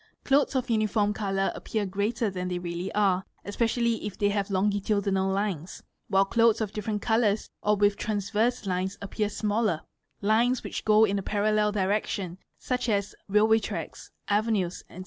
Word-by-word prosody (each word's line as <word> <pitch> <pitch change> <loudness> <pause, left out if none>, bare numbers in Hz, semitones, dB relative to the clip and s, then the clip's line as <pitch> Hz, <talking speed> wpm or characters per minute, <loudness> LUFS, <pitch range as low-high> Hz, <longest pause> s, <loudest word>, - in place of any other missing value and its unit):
Clothes 280 0 +2
of 255 -1 0
uniform 215 -2 +1
colour 195 -2 -1
appear 215 -2 -3
greater 205 +3 -1
than 180 -1 -4
they 180 -1 -2
really 175 +1 -4
are, 195 -3 +2 0.2
especially 230 +2 0
if 205 -2 -5
they 205 - +2
have 200 0 -1
longitudinal 200 0 +1
lines, 190 -4 -3 0.2
while 195 -1 +3
clothes 230 +2 +3
of 215 -3 -2
different 210 0 -3
colours 220 -2 +1
or 210 0 +3
with 205 0 +2
transverse 215 +3 -1
lines 190 +1 -2
appear 205 +1 -2
smaller; 210 -5 0 0.4
lines 230 +5 +2
which - - -5
go 215 0 +6
in 200 -1 0
a - - -3
parallel 210 +1 +1
direction, 195 -2 -1 0.2
such 250 -1 -2
as 200 -2 0 0.2
railway 215 +2 +4
tracks, - - -6 0.2
avenues, 205 -4 0
&c. 180 - -11
205 Hz, 160 wpm, -27 LUFS, 195-220 Hz, 0.4 s, go